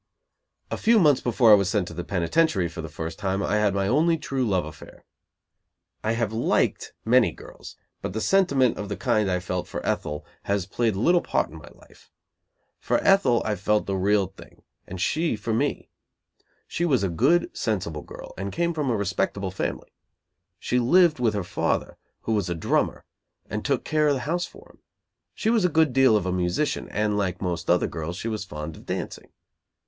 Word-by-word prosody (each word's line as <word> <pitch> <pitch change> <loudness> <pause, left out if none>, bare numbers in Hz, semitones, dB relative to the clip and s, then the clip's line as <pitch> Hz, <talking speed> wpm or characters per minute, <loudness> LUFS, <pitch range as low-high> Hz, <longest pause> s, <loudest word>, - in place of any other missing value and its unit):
A - - -2
few 230 +1 +4
months 150 -9 +4
before 120 -1 +4
I - - +11
was 100 -2 +4
sent 100 -3 0
to - - -9
the 90 - -5
penitentiary 100 - +1
for 85 0 -7
the 80 - -7
first 80 +3 -6
time, 95 -1 -1
I 105 - +1
had 105 -2 +2
my 100 0 0
only 160 +8 +3
true 135 -4 -2
love 95 -8 +1
affair. 75 - -12 1.0
I 110 - +1
have 115 -2 -1
liked 115 - 0
many 125 +1 +4
girls, - - -12 0.3
but 105 +5 -3
sentiment 140 - +2
of 105 - -5
the 100 - -4
kind 110 -6 +1
I 90 -1 +1
felt 90 -1 -4
for - - -6
Ethel 75 0 -2 0.2
has 100 -2 0
played 110 +2 0
little 170 - +3
part - - -1
in - - -10
my - - -14
life. - - -21 0.7
For - - +1
Ethel 165 -12 +4
I 105 - 0
felt 105 +2 +1
the 100 - -2
real 100 +1 +2
thing, 95 +1 -15 0.2
and 95 - -7
she 155 - 0
for 110 +2 -3
me. 110 - -1 0.8
She 170 - -3
was 135 - +2
a - - +2
good, 170 - +2
sensible - - -2
girl, - - -11
and - - -3
came 170 0 0
from 150 -4 -1
a 115 - +1
respectable 100 -1 -1
family. 95 - -4 0.6
She 125 - 0
lived 165 +4 +4
with 115 -3 +1
her 100 - -1
father, - - -1 0.3
who - - -3
was 100 -5 0
a 85 - -1
drummer, 80 - 0 0.5
and - - -3
took - - 0
care 155 -1 +2
of 145 - +3
the 130 - -3
house 175 +3 -1
for - - -16
him. - - -26 0.6
She 220 - 0
was 225 -4 +2
a 180 - +3
good 160 -4 +2
deal 130 -4 +5
of 95 - -3
a 90 - -1
musician, 90 +10 -1
and, 105 -1 0
like 95 -2 -1
most 90 -3 -3
other 90 +1 +4
girls, 80 +2 -5
she 110 - -4
was 110 -2 -3
fond 75 -4 -7
of - - -15
dancing. - - -5
105 Hz, 200 wpm, -25 LUFS, 95-140 Hz, 1.0 s, I